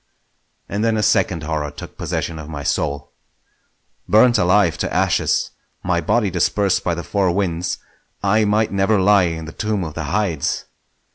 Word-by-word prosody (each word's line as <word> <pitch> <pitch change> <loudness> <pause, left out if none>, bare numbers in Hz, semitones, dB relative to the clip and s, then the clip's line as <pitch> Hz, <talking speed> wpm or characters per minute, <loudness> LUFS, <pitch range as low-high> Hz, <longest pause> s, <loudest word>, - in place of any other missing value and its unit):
And 105 +2 -2
then 115 -1 +2
a 105 - 0
second 90 -6 +1
horror 75 -1 -2
took 75 - -10
possession 80 -2 -3
of 75 0 -9
my 75 -2 -6
soul. 70 0 -2 1.0
Burnt 115 +2 +5
alive 90 -3 +3
to - - -2
ashes, - - +1 0.3
my 85 -1 0
body 105 +4 +1
dispersed 95 +3 +1
by 85 - 0
the 85 - -5
four 100 0 0
winds, 90 -2 -1 0.5
I 110 +2 +3
might 105 +1 +1
never 100 +2 +2
lie 100 0 +5
in 80 -1 -4
the 80 - -8
tomb 105 -1 -2
of 80 -3 -6
the 80 -1 -4
Hydes! 90 -2 -1
90 Hz, 165 wpm, -20 LUFS, 80-105 Hz, 1.0 s, Burnt